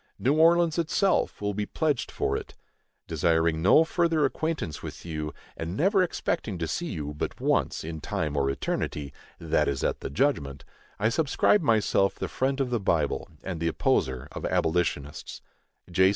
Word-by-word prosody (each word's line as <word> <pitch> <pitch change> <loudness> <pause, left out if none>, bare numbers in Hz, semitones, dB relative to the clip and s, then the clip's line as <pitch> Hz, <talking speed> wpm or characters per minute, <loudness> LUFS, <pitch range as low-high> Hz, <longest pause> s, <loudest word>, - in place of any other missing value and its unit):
New 135 - +2
Orleans, 170 +1 +4
itself, 180 +3 +1
will 105 0 0
be 105 +1 -2
pledged 150 -6 0
for - - -1
it. - - -6 0.5
Desiring 80 0 +1
no 100 - +6
further 165 -2 +2
acquaintance 155 - -2
with - - -8
you, 75 -2 -4 0.2
and 85 +4 -4
never 195 +4 +3
expecting 115 - -1
to 80 -1 -2
see 175 - -2
you 75 - -4
but 75 - -4
once - - +1
in 80 0 -5
time 75 0 -2
or 70 -1 +1
eternity, 70 +1 -3 0.2
that - - +1
is 70 -1 -1
at - - 0
the - - -5
judgment, 70 - 0 0.3
I 110 - +2
subscribe 160 - +3
myself 110 -7 +2
the - - -3
friend 135 +1 -1
of 130 -2 0
the 120 - +1
Bible, 95 - 0
and 90 -4 -4
the 85 - 0
opposer 65 -5 0
of - - -7
abolitionists, 80 -4 -1 0.5
J. 95 +2 +5
95 Hz, 165 wpm, -27 LUFS, -, 0.5 s, no